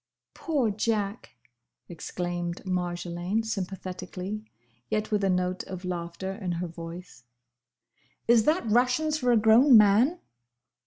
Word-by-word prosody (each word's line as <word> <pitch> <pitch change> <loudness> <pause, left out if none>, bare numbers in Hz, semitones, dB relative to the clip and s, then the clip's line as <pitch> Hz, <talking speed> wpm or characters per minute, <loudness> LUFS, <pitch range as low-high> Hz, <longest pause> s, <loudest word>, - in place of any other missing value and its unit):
"Poor 280 -10 0
Jack!" 210 - -2 0.5
exclaimed 175 +1 -4
Marjolaine 175 +2 -2
sympathetically, 195 0 -5 0.5
yet 215 0 -1
with 210 -1 +1
a 195 - +2
note 180 0 0
of 185 0 -7
laughter 175 +1 -4
in 190 -4 -4
her 170 +1 -3
voice. 170 -4 -9 1.0
"Is 230 -2 +5
that 315 0 +2
rations 250 +7 +2
for 250 -3 +2
a 235 - +5
grown 225 +4 +7
man?" 220 - +4
195 Hz, 115 wpm, -27 LUFS, 180-225 Hz, 1.0 s, grown